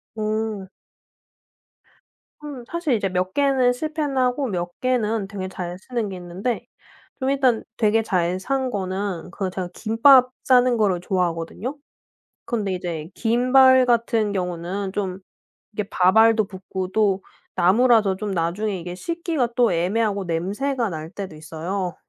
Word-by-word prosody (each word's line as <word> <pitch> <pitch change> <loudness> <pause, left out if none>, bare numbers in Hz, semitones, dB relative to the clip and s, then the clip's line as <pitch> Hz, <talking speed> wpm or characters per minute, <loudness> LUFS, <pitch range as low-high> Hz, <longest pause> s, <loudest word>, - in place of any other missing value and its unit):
오. 215 -2 -2 1.7
음 285 -4 -7
사실 340 -5 -1
이제 200 -3 -1
몇 185 +1 -1
개는 265 -3 +3
실패는 300 0 -3
하고 255 +1 +1
몇 175 -3 -4
개는 225 -5 0
되게 195 -2 -5
잘 180 -1 -6
쓰는게 215 -2 -3
있는데 180 +7 -4 0.5
좀 260 - 0
일단 265 -4 +2
되게 220 +1 +3
잘 180 -3 0
산 265 +4 -1
거는 190 -2 -3
그 190 -1 -3
제가 185 -1 -4
김밥 250 +3 +5
싸는 250 -1 +4
거를 195 -5 +2
좋아하거든요. 180 - -2 0.7
그런데 210 -5 -1
이제 170 -3 -5
김발 255 +2 +5
같은 230 -3 +1
경우는 185 +1 -3
좀 190 -2 -3 0.5
이렇게 205 -1 -4
밥알도 220 +4 +4
붙고 190 -1 -5
또 200 -2 +2 0.3
나무라서 210 +2 +4
좀 205 0 -4
나중에 185 +4 -1
이게 175 +1 -6
씻기가 330 - -2
또 240 -5 +4
애매하고 200 +3 0
냄새가 210 +9 -1
날 160 -2 -6
때도 190 -6 -7
있어요. 170 +4 -4
205 Hz, 270 characters per minute, -23 LUFS, 185-245 Hz, 1.7 s, 김밥